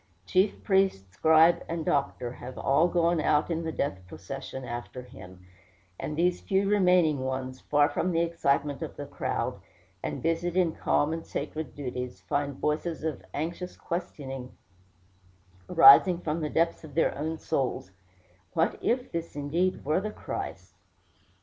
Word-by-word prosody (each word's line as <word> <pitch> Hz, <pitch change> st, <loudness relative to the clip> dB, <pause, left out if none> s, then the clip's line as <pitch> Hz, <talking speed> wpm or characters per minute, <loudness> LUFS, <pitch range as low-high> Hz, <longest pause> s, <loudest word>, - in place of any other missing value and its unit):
Chief 190 Hz, +2 st, +1 dB
priest, 190 Hz, -, +1 dB
scribe, 160 Hz, +7 st, +5 dB
and 165 Hz, -1 st, -3 dB
doctor 135 Hz, -3 st, 0 dB
have 125 Hz, +1 st, -9 dB
all 145 Hz, +5 st, +3 dB
gone 170 Hz, -1 st, +2 dB
out 150 Hz, +3 st, +2 dB
in 165 Hz, 0 st, -1 dB
the 160 Hz, -, -2 dB
death 140 Hz, -10 st, -2 dB
procession 130 Hz, +9 st, -7 dB
after 120 Hz, +1 st, -6 dB
him; 90 Hz, -6 st, -13 dB, 0.5 s
and 150 Hz, -, -4 dB
these 180 Hz, +1 st, +2 dB
few 195 Hz, 0 st, +1 dB
remaining 180 Hz, -7 st, +4 dB
ones, 130 Hz, 0 st, -3 dB
far 145 Hz, 0 st, +3 dB
from 180 Hz, +4 st, -1 dB
the 165 Hz, 0 st, +2 dB
excitement 145 Hz, -4 st, 0 dB
of -, -, -5 dB
the -, -, -6 dB
crowd, -, -, -3 dB, 0.4 s
and -, -, -4 dB
busied 165 Hz, +2 st, 0 dB
in 175 Hz, -3 st, +3 dB
calm 150 Hz, +2 st, +1 dB
and 165 Hz, 0 st, -6 dB
sacred 155 Hz, -4 st, -5 dB
duties, 125 Hz, -6 st, -5 dB
find 140 Hz, +8 st, -2 dB
voices 155 Hz, +3 st, -2 dB
of 160 Hz, -2 st, -3 dB
anxious 170 Hz, +4 st, -4 dB
questioning 135 Hz, -7 st, -5 dB, 1.1 s
rising 155 Hz, +6 st, +8 dB
from 165 Hz, -1 st, -3 dB
the 150 Hz, -, -1 dB
depths 165 Hz, +2 st, +1 dB
of 155 Hz, -3 st, -11 dB
their 165 Hz, -, +2 dB
own 160 Hz, +3 st, -3 dB
souls, 130 Hz, -10 st, -2 dB, 0.6 s
"What 165 Hz, -, +1 dB
if 250 Hz, +1 st, 0 dB
this 170 Hz, -2 st, -4 dB
indeed 160 Hz, +6 st, -1 dB
were 155 Hz, +6 st, +2 dB
the 215 Hz, -, -3 dB
Christ?" -, -, -6 dB
155 Hz, 150 wpm, -28 LUFS, 135-170 Hz, 1.1 s, rising